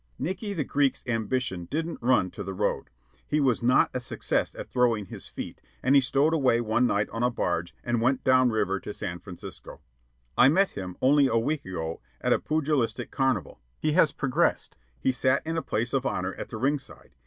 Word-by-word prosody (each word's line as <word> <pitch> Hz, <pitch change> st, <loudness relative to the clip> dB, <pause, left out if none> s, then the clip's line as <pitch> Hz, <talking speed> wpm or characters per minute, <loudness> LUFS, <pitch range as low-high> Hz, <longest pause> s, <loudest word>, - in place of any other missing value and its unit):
Nickey 190 Hz, +4 st, -3 dB
the 160 Hz, -6 st, -1 dB
Greek's 140 Hz, 0 st, 0 dB
ambition 115 Hz, -5 st, -1 dB
didn't 165 Hz, -, -3 dB
run 120 Hz, -6 st, +2 dB
to -, -, -8 dB
The 95 Hz, 0 st, -5 dB
Road. 105 Hz, +2 st, -1 dB, 0.4 s
He 150 Hz, -, +1 dB
was 130 Hz, -5 st, +2 dB
not 125 Hz, +2 st, +4 dB
a 130 Hz, -, -1 dB
success 125 Hz, -, -2 dB
at -, -, -7 dB
throwing 120 Hz, -5 st, +2 dB
his -, -, -7 dB
feet, -, -, -7 dB, 0.2 s
and 130 Hz, -, +3 dB
he 140 Hz, -, +7 dB
stowed 140 Hz, +4 st, +2 dB
away 130 Hz, -7 st, +3 dB
one 120 Hz, +2 st, +2 dB
night 105 Hz, -2 st, +1 dB
on 115 Hz, -, -4 dB
a 125 Hz, -, +3 dB
barge 85 Hz, -7 st, -2 dB
and 120 Hz, -1 st, 0 dB
went 130 Hz, +2 st, +1 dB
down 130 Hz, -1 st, +5 dB
river 100 Hz, -4 st, 0 dB
to 105 Hz, -, -7 dB
San 90 Hz, -4 st, -5 dB
Francisco. 90 Hz, 0 st, -10 dB, 0.6 s
I 130 Hz, -, +7 dB
met 190 Hz, +6 st, +3 dB
him, 90 Hz, -2 st, -7 dB
only 140 Hz, +1 st, +5 dB
a 115 Hz, -, +1 dB
week 140 Hz, +6 st, 0 dB
ago, 80 Hz, -3 st, -4 dB, 0.2 s
at -, -, +2 dB
a -, -, +1 dB
pugilistic 150 Hz, -5 st, -1 dB
carnival. 130 Hz, -, -1 dB, 0.2 s
He 155 Hz, -, +1 dB
has 155 Hz, -1 st, +4 dB
progressed. 130 Hz, -2 st, 0 dB, 0.2 s
He -, -, +2 dB
sat 130 Hz, +2 st, +1 dB
in 165 Hz, +1 st, -2 dB
a 165 Hz, -, 0 dB
place 120 Hz, -1 st, -2 dB
of 135 Hz, -1 st, +1 dB
honor 95 Hz, -8 st, -2 dB
at -, -, -7 dB
the 110 Hz, -, -6 dB
ring 140 Hz, +5 st, +1 dB
side. 100 Hz, -, -13 dB
125 Hz, 205 wpm, -27 LUFS, 105-140 Hz, 0.6 s, he